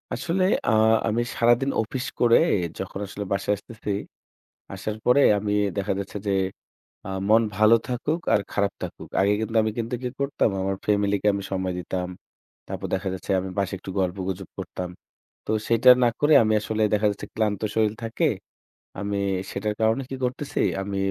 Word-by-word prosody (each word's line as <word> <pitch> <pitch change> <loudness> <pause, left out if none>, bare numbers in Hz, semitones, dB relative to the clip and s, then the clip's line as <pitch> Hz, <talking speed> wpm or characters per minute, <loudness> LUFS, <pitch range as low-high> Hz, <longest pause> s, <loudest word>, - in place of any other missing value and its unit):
আসলে 185 +2 0 0.2
আ - - +4 0.4
আমি 115 +2 +1
সারাদিন 120 +3 +3
অফিস 125 +4 -4
করে, 120 -1 +6 0.4
যখন 95 +1 -5
আসলে 100 +1 -5
বাসায় 100 +1 0
আসতেছি, 105 +1 -7 0.8
আসার 105 +2 -4
পরে 130 +3 +5 0.2
আমি, 105 0 -1 0.2
দেখা 100 0 0
যাচ্ছে 100 +1 -5
যে, 100 - +2 0.8
আ - - -5 0.2
মন 110 +1 +6
ভালো 110 +2 +6
থাকুক 145 +7 -1
আর - - +4
খারাপ 100 -1 +1
থাকুক, - - -7
আগে 100 +1 +4
কিন্তু 110 +1 -2
আমি 110 - 0
কিন্তু 115 +1 -2
কি 125 - -1
করতাম? 140 -4 +1
আমার 95 +1 -1
ফ্যামিলিকে 100 -1 +1
আমি 100 - -3
সময় 95 -1 -1
দিতাম। 90 +1 -3 0.6
তারপর - - -5
দেখা 95 +1 -2
যাচ্ছে, 95 +2 -7
আমি 95 - -5
বাসায় 100 0 -1
একটু 95 - -8
গল্প-গুজব 95 0 -3
করতাম। 90 -1 -5 0.6
তো, - - -3 0.2
সেইটা 115 +2 +6
না - - +5
করে 145 +1 +4
আমি 110 -1 +2
আসলে 110 +1 -2
দেখা 105 0 +2
যাচ্ছে, 100 - -6
ক্লান্ত 105 -3 0
শরীর 110 -1 +2
থাকে, 115 - 0 0.7
আমি 100 0 -2 0.3
সেটার 105 +2 -2
কারণে 110 +4 +2
কি 135 - -4
করতেছি? 130 +3 -2 0.2
আমি 100 0 -4
105 Hz, 170 wpm, -25 LUFS, 100-115 Hz, 0.8 s, করে